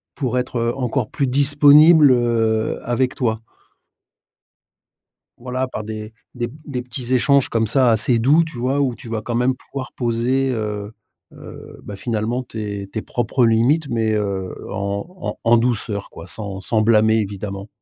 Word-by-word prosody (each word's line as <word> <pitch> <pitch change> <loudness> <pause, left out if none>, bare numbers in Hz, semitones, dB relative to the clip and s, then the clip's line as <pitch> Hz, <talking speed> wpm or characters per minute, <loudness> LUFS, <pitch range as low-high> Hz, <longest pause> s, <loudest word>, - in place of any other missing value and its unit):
pour 125 -3 -2
être, 125 0 -4
heu, 115 0 0
encore 125 -2 -1
plus 140 - -1
disponible, 145 +3 +6
heu, 115 -3 +1
avec 125 +1 0
toi». 110 -3 -1 2.0
Voilà 130 +1 -3
par 120 -4 -6
des 110 0 -7 0.2
des 120 -1 -2
p 120 - -14
des 125 -4 -4
petits 125 0 -5
échanges 130 +2 +3
comme 115 -1 0
ça, 125 +2 +3
assez 115 +2 +2
doux, 150 +8 +4
tu 160 -4 -10
vois? 130 +4 0
Où 130 -4 +1
tu 115 - -12
vas 115 -1 -3
quand 120 +2 -5
même 125 +2 +2
pouvoir 135 0 -8
poser, 125 +3 0
heu 105 -2 -4 0.4
heu, - - -12
bah 100 - -8
finalement 115 +3 -2
tes 105 -4 -6
tes 110 +2 -5
propres 125 +1 0
limites 120 +7 +2
mais, 115 -3 0
heu, 100 -3 -2 0.2
en 100 0 -3
en - - -5
en 115 0 +4
douceur 115 -4 -1
quoi 80 +2 -11
sans, 100 -2 -4
sans 110 +2 0
blâmer 110 0 +4
évidemment. 100 -1 -5
120 Hz, 165 wpm, -20 LUFS, 110-130 Hz, 2.0 s, disponible